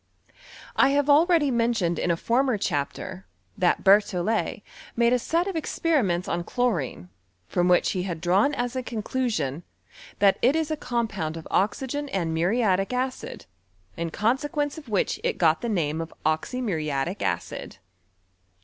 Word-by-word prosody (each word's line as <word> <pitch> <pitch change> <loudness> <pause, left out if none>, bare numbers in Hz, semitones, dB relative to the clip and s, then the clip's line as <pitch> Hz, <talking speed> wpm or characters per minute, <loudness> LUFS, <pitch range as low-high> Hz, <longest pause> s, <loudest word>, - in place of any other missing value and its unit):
I - - +5
have 285 0 +3
already 315 -1 +4
men 235 0 +2
tioned 175 -5 0
in - - -1
a 170 - +2
former 245 +4 +1
chapter, 185 +4 -3 0.3
that 185 -4 +1
Berthollet 205 +2 +2 0.3
made 235 +1 +3
a 250 - +3
set 335 +8 0
of 390 -2 -4
experiments 280 - 0
on 170 0 -1
chlorine, 170 - -2 0.4
from 175 0 +1
which 180 -1 +3
he 185 - -1
had 175 -3 -4
drawn 190 - +2
as 245 0 -2
a 255 - -1
conclusion, 215 - -2 0.6
that 200 -1 +4
it 260 +5 +4
is 320 -1 0
a - - +1
compound 215 - -2
of 160 - -9
oxygen 270 +8 0
and 170 -7 -1
muriatic 195 +3 +1
acid, 255 +1 -3 0.5
in 170 0 -3
consequence 285 - 0
of 290 - -14
which 205 -3 0
it - - 0
got 160 -2 +3
the 235 - -2
name 165 -6 0
of 165 - -6
oxymuriatic 160 - -1
ctdd. - - -3
210 Hz, 150 wpm, -25 LUFS, 175-255 Hz, 0.6 s, I